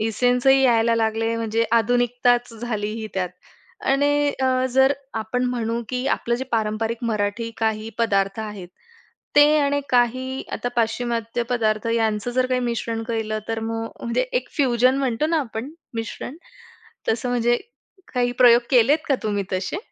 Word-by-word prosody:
एसेन्सही 250 +4 +3
यायला 230 -2 +4
लागले 225 0 0
म्हणजे 225 0 0
आधुनिकताच 245 +1 +1
झाली 220 -2 -3
ही 220 - -4
त्यात 185 -1 -1 0.6
आणि 290 +1 +3
अ, 255 0 +2
जर 265 +1 +5 0.3
आपण 250 +3 -2
म्हणू, 235 -2 -1
की 250 +1 -2
आपलं 235 -3 0
जे 260 +2 -3
पारंपरिक 225 +1 -1
मराठी 215 +2 -1
काही 220 0 -1
पदार्थ 200 -2 +1
आहेत 210 -4 -7 0.7
ते 290 0 +9
आणि 285 0 +1
काही 255 +1 +1
आता 245 - -2
पाश्चिमात्य 230 0 -1
पदार्थ 220 -2 0
यांचं 220 0 0
जर 255 +1 +1
काही 255 0 0
मिश्रण 230 -1 -2
केलं 220 -1 -2
तर 225 0 -2
मग 225 0 -3 0.2
म्हणजे 235 - 0
एक - - -1
फ्युजन 255 -1 +3
म्हणतो 265 +1 0
ना 325 0 +1
आपण 235 +1 -5 0.2
मिश्रण 230 +5 -5 0.7
तसं 230 +3 0
म्हणजे 240 0 +2 0.6
काही 245 -1 +1
प्रयोग 245 -1 +6
केलेत 265 +5 +5
का 275 - +4
तुम्ही 205 -2 -1
तसे? 185 - -2
235 Hz, 150 wpm, -22 LUFS, 225-250 Hz, 0.7 s, ते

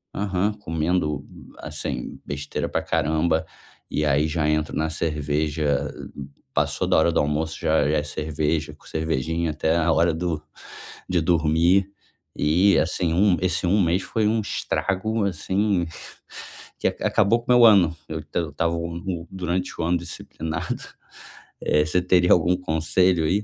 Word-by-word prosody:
aham, 100 +1 0
comendo, 80 -6 -1 0.3
assim, - - -5
besteira 70 0 -4
pra - - -1
caramba. 80 +1 +1 0.5
E, 75 - 0
aí, 75 +1 +2
já 75 -1 0
entro 75 0 0
na 80 +2 0
cerveja, 75 -2 -1 0.6
passou - - 0
da - - +3
hora 80 +2 +4
do - - +1
almoço, 75 +2 -1
já 80 - +2
já 75 - +2
é 75 - 0
cerveja, 75 0 -2
cervejinha, 80 +1 -1
até 80 +2 0
a 85 0 +2
hora 85 +1 +3
do 80 -2 -2 0.7
de 90 -2 +2
dormir 85 +3 +3 0.5
e, 90 +5 +3
assim, 85 0 0
um 95 +1 +4
esse 90 -1 0
um 100 +4 +3
mês 90 +2 +2
foi 105 +3 0
um 110 +1 +1
estrago, 105 +1 -1
assim, 95 +1 0 0.9
que - - +1
ac - - -3
acabou 115 +4 +3
com - - -1
meu 120 -1 +6
ano, 95 -7 +6
eu 80 -1 -4
eu 85 -2 -1
estava, 85 +4 0 0.6
durante 90 0 -2
o - - 0
ano, 85 +2 +2
disciplinado, 80 +2 -5 0.8
eh, 75 0 +2
você 85 +4 +1
teria 90 0 +4
algum 90 +1 +3
conselho, 85 +1 +1
aí? 100 +6 +1
80 Hz, 145 wpm, -24 LUFS, 75-90 Hz, 0.9 s, meu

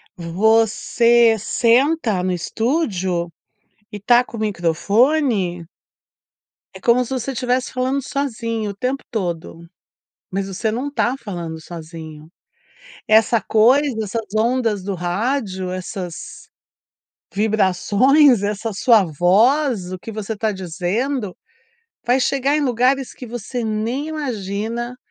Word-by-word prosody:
você 225 +5 +3
senta 235 - +2
no 185 0 -1
estúdio, 185 - -1 0.6
e 210 - -6
está 240 +4 +4
com 240 - -11
o - - -6
microfone 205 - +1 1.1
é - - -10
como 250 0 +3
se 240 - -11
você 260 +1 -2
estivesse 250 0 -1
falando 260 +2 0
sozinho 230 -6 -3
o 200 - -7
tempo 255 +6 -3
todo, 175 -7 -4 0.7
mas 195 +1 -2
você 195 +3 -2
não 250 +6 -3
está 265 -3 0
falando 170 -8 -6
sozinho. 160 -2 -10 0.8
Essa 220 +1 +4
coisa, 255 +5 +3
essas 220 +2 -3
ondas 225 -2 +1
do 195 +1 -3
rádio, 190 +1 -2
essas 185 -1 -7 0.9
vibrações, 215 - +3
essa 210 +1 -2
sua 215 -1 +4
voz, 195 - +2
o 185 - -6
que 225 - -8
você 215 0 -4
está 220 0 -1
dizendo 195 - -3 0.7
vai 250 +2 +3
chegar 275 +3 +1
em - - +1
lugares 260 0 +1
que 250 - -10
você 240 +1 -5
nem 225 +6 -2
imagina, 235 -4 -4
220 Hz, 115 wpm, -20 LUFS, 190-250 Hz, 1.1 s, está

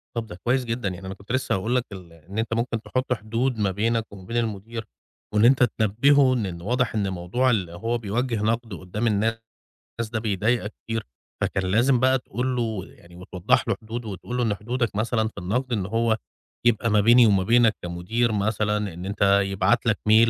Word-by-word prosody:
طَب 115 -1 -3
ده 90 - -8
كويس 125 +1 +1
جدًا، 115 -3 -2
يعني 95 +1 -8
أنا 95 - -4
كنت 100 +2 -11
لسّه 130 +1 +1
هاقول 110 +6 -1
لك 125 -1 +1
ال 90 -4 -10
إن 85 +6 -11
أنت 115 0 -1
ممكن 115 0 -1
تحُط 130 +2 -1
حدود 115 +3 -1
ما 100 -2 +1
بينك 110 +3 -1
وما 95 -2 -11
بين 115 +4 -3
المدير 115 0 -3 0.5
وإن 105 +1 +4
أنت 130 +1 +6
تنبّهه 130 +6 +4
إن 120 -5 0
إن 85 -3 -6
واضح 125 +4 0
إن 100 -2 0
موضوع 95 +9 0
ال 95 -7 0
هو 115 +8 -2
بيوجّه 115 +1 -2
نَقْد 115 0 -1
قُدّام 90 +6 -3
الناس 110 +1 +1 0.7
ده 110 - 0
بيضايقك 110 +1 0
كتير، 115 -1 -3 0.4
فكان 95 - 0
لازم 120 +4 +4
بقى 130 +1 +3
تقول 125 +1 -3
له 110 -6 -2
يعني 85 -2 -17
وتوضّح 90 0 0
له - - +1
حدود 115 +2 -6
وتقول 110 +4 -5
له 125 - +1
إن 110 -3 +1
حدودك 120 +1 -2
مثلًا 110 +1 +1
في 110 - -11
النَقْد 120 +8 -2
إن 100 -5 -1
هو 115 +2 +1 0.5
يبقى 115 -1 +3
ما 105 -1 +4
بيني 120 +3 +7
وما 100 -3 +3
بينك 115 +2 +4
كمدير 90 +8 -1
مثلًا 105 -1 0
إن 90 +2 -7
أنت 100 +1 -5 0.2
يبعت 100 0 +1
لك - - +2
mail 110 +1 +6
110 Hz, 200 wpm, -24 LUFS, 100-120 Hz, 0.7 s, بيني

